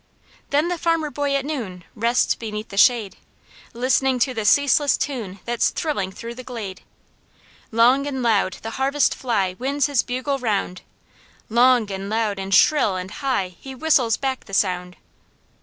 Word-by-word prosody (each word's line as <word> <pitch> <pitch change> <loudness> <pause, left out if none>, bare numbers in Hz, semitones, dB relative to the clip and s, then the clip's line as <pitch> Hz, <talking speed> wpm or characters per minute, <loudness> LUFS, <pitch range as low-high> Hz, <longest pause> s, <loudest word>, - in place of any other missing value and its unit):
"'Then 295 +4 +2
the 350 -1 -2
farmer 330 -3 0
boy 285 -1 -1
at 275 -1 -1
noon, 220 - -5
rests 235 +3 +1
beneath 215 -1 -6
the - - -9
shade, 215 -1 +3 0.5
Listening 255 +2 +1
to 255 +1 +1
the 220 -3 -3
ceaseless 285 +3 +4
tune 225 -9 -4
that's 240 0 +1
thrilling 205 - -2
through 230 +5 -8
the 255 +1 -9
glade. 220 -7 -7 0.9
Long 250 +5 +4
and 265 -3 -3
loud 205 -5 +2
the 225 - -5
harvest 275 +2 +2
fly 200 -8 -1
winds 275 +2 0
his 285 -4 +2
bugle 260 +3 -3
round, 200 -6 -2 0.7
Long, 240 -2 +4
and 195 +1 -5
loud, 215 -2 -1
and 195 0 -5
shrill, 205 +1 +4
and 185 +1 -5
high, 255 -10 -1
he 265 -1 -9
whistles 255 -6 +2
back 265 -1 -3
the 195 - -5
sound.'" 180 -2 0
240 Hz, 160 wpm, -22 LUFS, 205-275 Hz, 0.9 s, ceaseless